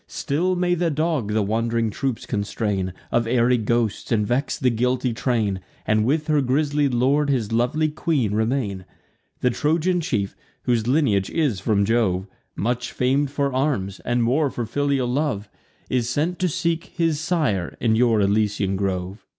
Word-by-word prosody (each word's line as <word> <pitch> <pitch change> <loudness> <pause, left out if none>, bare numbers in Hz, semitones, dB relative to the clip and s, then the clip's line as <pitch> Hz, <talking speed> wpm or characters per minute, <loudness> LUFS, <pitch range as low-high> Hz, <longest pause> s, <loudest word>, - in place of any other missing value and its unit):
Still 175 +6 -1
may 175 0 +1
the 175 -1 +1
dog 155 -7 -1
the 110 -1 +2
wand'ring 115 +2 0
troops 130 +1 -3
constrain 100 -2 -2 0.2
Of 120 -1 +1
airy 120 +1 +3
ghosts, 115 0 -1
and 105 -3 +2
vex 125 +5 0
the 125 -2 +2
guilty 125 +1 0
train, 110 -5 0 0.3
And 110 0 +2
with 150 +5 +1
her 150 -2 +2
grisly 145 +2 +1
lord 135 +4 +2
his 120 -6 0
lovely 125 +7 +1
queen 150 - 0
remain. 110 -4 -1 0.6
The 125 - +3
Trojan 165 +7 +1
chief, 105 -11 -2 0.3
whose 120 -2 +1
lineage 125 -9 +2
is 145 - 0
from 100 +1 +1
Jove, 100 -5 +1 0.3
Much 125 +3 -2
fam'd 135 +3 +1
for 140 -1 -1
arms, 130 -9 -1
and 120 0 0
more 140 +5 +2
for 120 -2 -4
filial 140 +1 0
love, 125 -5 -1 0.4
Is 120 -2 0
sent 160 +7 -1
to 185 -1 +1
seek 165 0 -1
his 165 -4 -1
sire 155 - -1
in 110 -2 +2
your 115 -1 +3
Elysian 100 -1 +1
grove. 95 +1 -3
125 Hz, 160 wpm, -23 LUFS, 110-145 Hz, 0.6 s, airy